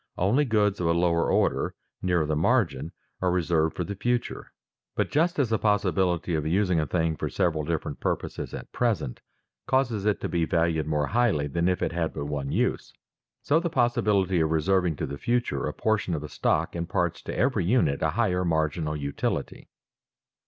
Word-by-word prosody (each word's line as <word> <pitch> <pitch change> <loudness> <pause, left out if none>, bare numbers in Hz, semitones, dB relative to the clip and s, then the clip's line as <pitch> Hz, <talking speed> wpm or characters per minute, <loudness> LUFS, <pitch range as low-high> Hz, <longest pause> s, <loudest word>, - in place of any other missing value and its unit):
Only 115 +11 +2
goods 105 -4 +1
of 85 - 0
a 85 - +3
lower 85 -1 +2
order, - - +1 0.3
nearer 90 -4 +1
the 75 0 -1
margin, 80 - +1 0.3
are 90 - +2
reserved 85 -3 +1
for 90 - -2
the 100 - -4
future. 120 +4 -2 0.4
But - - -1
just 170 +4 +2
as 130 -6 +1
the 110 - +2
possibility 95 -4 +1
of 80 -2 0
using 90 0 +2
a 75 - -1
thing 80 0 0
for - - -3
several 80 -3 0
different 80 +1 -3
purposes - - -3
at - - -8
present 105 - -1 0.5
causes 120 -6 +1
it 105 - +1
to - - -1
be 85 -1 0
valued 80 -1 +1
more 75 -1 +1
highly 110 -8 +1
than 85 +5 0
if 90 - 0
it - - 0
had 85 -1 -2
but 70 - -3
one 70 -2 -3
use, - - -1 0.5
so 150 +3 +3
the 170 0 -2
possibility 105 - +2
of 80 -1 +2
reserving 85 +1 +2
to - - -3
the 70 +1 -6
future 120 0 0
a - - -3
portion 110 -6 0
of 75 - -4
a 75 - -7
stock 80 +2 0
imparts 85 0 -1
to - - -6
every 120 -7 +1
unit 85 - +2
a - - +2
higher 90 0 +1
marginal 80 -2 0
utility. 70 -1 -3
90 Hz, 190 wpm, -26 LUFS, 80-105 Hz, 0.5 s, a